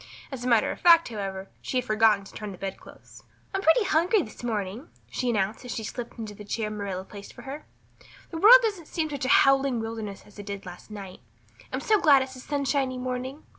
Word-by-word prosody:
As 260 -3 -6
a - - -2
matter 235 -3 +3
of - - -8
fact, 335 -3 +6
however, 195 -3 -5
she 255 - -3
had 250 - 0
forgotten 215 -2 +3
to - - -14
turn 210 -1 -6
back 190 - -10
the - - -4
bedclothes. - - -16 0.3
"I'm 385 - -1
pretty 390 +5 +4
hungry 370 +2 +2
this 220 - -12
morning," 220 - -3 0.2
she 250 - -1
announced 210 0 -1
as 250 - -5
she 225 - -4
slipped 235 +2 -6
into 220 -2 -6
the 210 - -11
chair 215 +1 -3
Marilla 200 -3 -4
placed 200 +1 -11
for - - -12
her. 275 +3 -8 0.6
"The 325 - -4
world 485 +7 +9
doesn't 400 -8 -2
seem 315 -2 -2
such 280 -3 -3
a - - -1
howling 275 -3 +4
wilderness 225 -3 -5
as 210 0 -16
it 205 - -9
did 200 -1 -6
last 180 +3 -11
night. 195 -3 -9 0.5
I'm 260 - -3
so 425 +6 +3
glad 285 -6 +6
it's 260 0 -9
a - - -10
sunshiny 275 -1 -1
morning. 255 +3 -4
245 Hz, 225 wpm, -26 LUFS, 210-280 Hz, 0.6 s, world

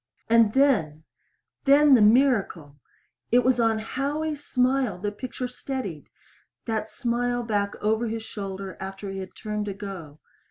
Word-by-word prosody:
And 225 -2 +4
then 185 - +2 0.6
then 285 +1 +6
the 245 - +6
miracle! 210 - +2 0.5
It 245 +1 +5
was 255 -1 +3
on 225 -1 +3
Howie's 290 +6 -3
smile 255 -4 +1
the 205 +3 -3
picture 250 +3 -5
steadied 250 - -6 0.6
that 220 -2 -2
smile 245 +1 -1
back 205 -3 -1
over 220 +2 +1
his 225 0 -4
shoulder 195 -3 -6
after 195 +1 -6
he 195 - -5
had 190 -1 -8
turned 210 -2 -4
to 200 -2 -4
go. 185 -7 -8
220 Hz, 145 wpm, -25 LUFS, 195-255 Hz, 0.6 s, then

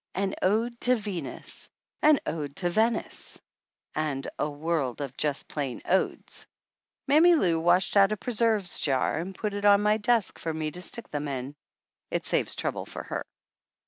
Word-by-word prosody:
An 195 +1 0
ode 230 +5 +1
to 250 0 +5
Venus, 205 -6 -5 0.3
an 305 -1 +6
ode 145 -3 -4
to 175 -2 +1
Venice, 220 +3 0 0.5
and 150 -3 -2
a 150 - 0
world 145 -4 -2
of 135 -3 -5
just 145 -2 0
plain 140 -5 -4
odes. 190 +1 -1 0.6
Mammy 335 +4 +6
Lou 175 - +2
washed 175 +4 +3
out 200 0 +6
a 215 - -1
preserves 220 -5 +1
jar 135 +2 +1
and 185 +3 -5
put 210 0 -3
it 205 0 -4
on 205 0 +6
my 210 +1 +3
desk 225 -1 +1
for 165 - -3
me 155 -1 -3
to 180 - -8
stick 230 +5 -5
them 145 0 -3
in. 135 0 -4 0.5
It - - -2
saves - - 0
trouble - - -3
for - - -7
her. - - -4
185 Hz, 170 wpm, -27 LUFS, 150-215 Hz, 0.6 s, an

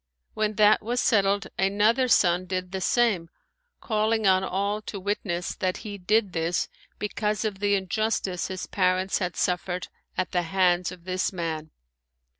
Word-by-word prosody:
When 215 0 -1
that 210 0 +5
was 240 +3 -1
settled 200 -3 +2
another 210 +6 +3
son 180 -5 +3
did 185 -1 -3
the 190 -1 -3
same, 195 -6 +2 0.5
calling 220 0 +1
on 190 -1 +4
all 200 +3 -1
to 205 -1 -6
witness 185 -3 -2
that 185 -1 -1
he 205 -1 -6
did 205 +1 +1
this 165 +1 0 0.3
because 210 +1 -2
of 200 -3 -3
the 205 0 +2
injustice 195 -1 -1
his 185 -1 -5
parents 185 0 +1
had 180 -2 -2
suffered 180 0 -1 0.3
at 185 - -1
the 180 - +1
hands 180 0 +2
of 180 -2 -11
this 185 0 -1
man. 160 -4 -4
190 Hz, 155 wpm, -26 LUFS, 180-210 Hz, 0.5 s, that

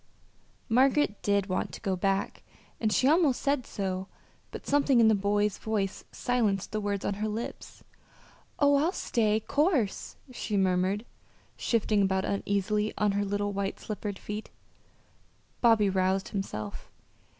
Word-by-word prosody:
Margaret 260 -1 +3
did 200 -1 +2
want 185 -1 -2
to - - -7
go 190 -1 0
back, 195 +2 -1 0.4
and 215 -2 +1
she 255 - +3
almost 305 -4 +4
said 280 -3 0
so, 190 -1 -3 0.4
but - - -9
something 280 -3 +3
in 225 -1 +6
the - - +5
boy's 205 0 +1
voice 205 -3 -2
silenced 215 -6 0
the 215 - -2
words 200 -1 -2
on - - 0
her 215 - 0
lips. 220 +2 -6 0.7
"Oh, 285 -1 +4
I'll 320 +6 +1
stay, 215 - +1
'course," 285 - 0 0.2
she 220 -4 -3
murmured, 190 +3 +1 0.5
shifting 215 -3 +1
about 190 -1 +1
uneasily 205 +1 -1
on 210 -1 +2
her 200 +1 0
little 205 0 -1
white 195 0 -3
slippered 205 -2 -5
feet. 210 +2 -6 1.1
Bobby 225 -4 +5
roused 190 0 +1
himself. 110 - -5
205 Hz, 140 wpm, -29 LUFS, 195-230 Hz, 1.1 s, in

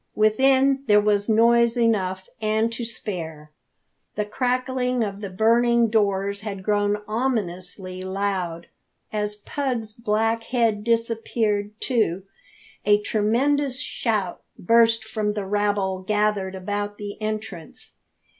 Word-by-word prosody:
Within 265 +5 +4
there 210 -1 +6
was 205 0 +1
noise 235 +2 +4
enough 190 -5 +1
and 220 +1 +1
to 235 - -4
spare. 165 -9 -6 0.6
The 210 - -1
crackling 250 +1 0
of 200 -1 -4
the 200 - -4
burning 230 +3 +3
doors 200 -2 +1
had 200 -3 -6
grown 205 0 +1
ominously 190 -5 -3
loud. 185 -3 -2 0.5
As 210 0 -1
Pug's 230 -1 -3
black 225 0 0
head 225 -4 +1
disappeared, 225 -2 0
too, 210 -8 0 0.6
a 205 0 +4
tremendous 255 +6 +1
shout 210 -6 -2 0.2
burst 230 +3 +4
from 215 -1 -2
the 205 -2 -3
rabble 200 -1 0
gathered 210 -1 0
about 205 +2 -3
the 205 +1 -7
entrance. 215 -6 -5
210 Hz, 115 wpm, -24 LUFS, 200-230 Hz, 0.6 s, there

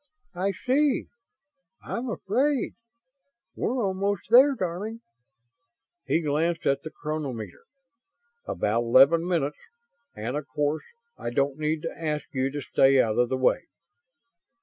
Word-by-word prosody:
"I 190 +2 -1
see.... 275 +1 +2 0.8
I'm 245 +2 -4
afraid. 255 +7 0 0.8
We're 245 -2 -1
almost 195 +1 -2
there, 270 +4 +7
darling." 205 +4 -4 1.1
He 165 - +1
glanced 160 +3 0
at 140 -1 +2
the 155 - -7
chronometer. 135 - -5 0.8
"About 110 +3 0
eleven 135 +8 +5
minutes. 150 -5 0 0.6
And 115 +5 -4
of 150 -1 -4
course 150 +3 -1 0.3
I - - -3
don't 140 +3 0
need 155 0 -1
to 165 - -4
ask 150 -1 -1
you 130 0 0
to 145 0 -5
stay 135 +1 +4
out 110 -2 +2
of 120 -1 +3
the 130 - 0
way." 130 - +1
155 Hz, 125 wpm, -26 LUFS, 135-195 Hz, 1.1 s, there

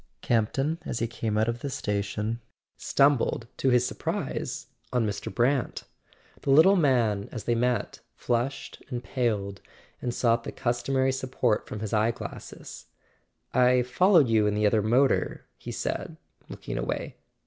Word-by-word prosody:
Campton, 135 +8 0
as - - -4
he 115 - 0
came 115 -2 -2
out 110 +1 +2
of 115 0 -2
the 140 - -4
station, 105 0 -2 0.3
stumbled, 140 -3 +2
to 135 - +2
his 125 -1 +4
surprise, 125 - -3 0.3
on 120 -2 +1
Mr. 100 -2 -3
Brant. 125 +2 0 0.6
The - - -4
little 160 +8 +7
man, 120 - +2
as 115 - -6
they 120 - +1
met, 120 -2 0 0.2
flushed 120 +3 -2
and 125 -2 -4
paled, 100 -3 -2 0.4
and 125 - -1
sought 115 -1 +1
the - - -5
customary 130 +2 0
support 130 -4 -1
from 105 - -6
his 110 -1 -4
eye 110 +1 +3
glasses. 115 - -8 0.7
"I 125 0 +4
followed 160 +4 +4
you 110 -2 +3
in 105 - 0
the 105 0 +1
other 105 +1 +3
motor," 125 +6 +2
he - - -8
said, - - -4 0.3
looking - - -5
away. - - -3
120 Hz, 150 wpm, -27 LUFS, 110-130 Hz, 0.7 s, little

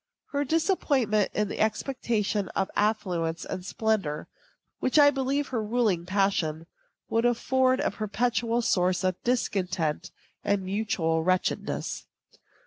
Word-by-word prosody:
Her 285 0 0
disappointment 280 - +1
in 210 0 +1
the - - -6
expectation 220 -3 0
of 190 - 0
affluence 180 -6 0
and 185 -1 -5
splendor, 195 -7 -1 0.5
which 260 - +1
I 285 -1 +8
believe 275 +1 -1
her 240 -4 -1
ruling 210 -6 0
passion, 185 -5 0 0.4
would 230 +1 +1
afford 255 +2 +2
a - - 0
perpetual 235 +2 0
source 180 -3 +2
of 185 -1 -1
discontent 185 -10 -1 0.3
and 200 -1 +1
mutual 185 -5 0
wretchedness. 185 +1 -1
210 Hz, 120 wpm, -27 LUFS, 185-245 Hz, 0.5 s, I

